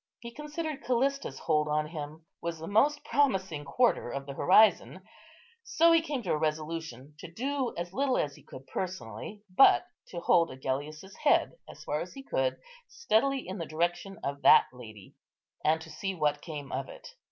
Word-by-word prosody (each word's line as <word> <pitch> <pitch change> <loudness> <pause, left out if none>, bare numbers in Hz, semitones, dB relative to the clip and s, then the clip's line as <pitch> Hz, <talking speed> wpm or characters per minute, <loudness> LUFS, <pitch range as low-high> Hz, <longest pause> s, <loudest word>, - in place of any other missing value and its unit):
He 235 0 -9
considered 300 +1 -5
Callista's 270 +3 0
hold 150 -2 +1
on 150 0 0
him 155 0 -8 0.2
was 170 -1 -3
the 160 - -8
most 280 - +2
promising 190 - +1
quarter 145 - +1
of 135 +2 -5
the 140 - -7
horizon; 210 +9 +4 0.6
so 335 -6 +3
he 330 -1 +5
came 290 -6 -4
to 180 - -2
a - - +2
resolution 155 -3 -4
to 170 - -9
do 265 +6 -2
as 175 +1 -5
little 270 +1 +1
as 145 -2 -1
he - - -16
could 130 +1 -12
personally, 185 - -6
but 275 - +6 0.2
to 175 - -6
hold 170 0 +3
Agellius's 145 +8 -5
head, - - +3 0.2
as - - -11
far 150 +1 -2
as 180 - -7
he 270 - -9
could, - - -1 0.3
steadily 275 - 0
in 190 +1 -5
the 165 - -4
direction 175 +4 -2
of 140 0 -4
that - - +7
lady, 110 -5 -12 0.5
and 155 +1 +3
to 160 0 -11
see 195 -1 -4
what 150 -3 0
came 145 -4 -7
of - - -3
it. - - -11
175 Hz, 180 wpm, -29 LUFS, -, 0.6 s, that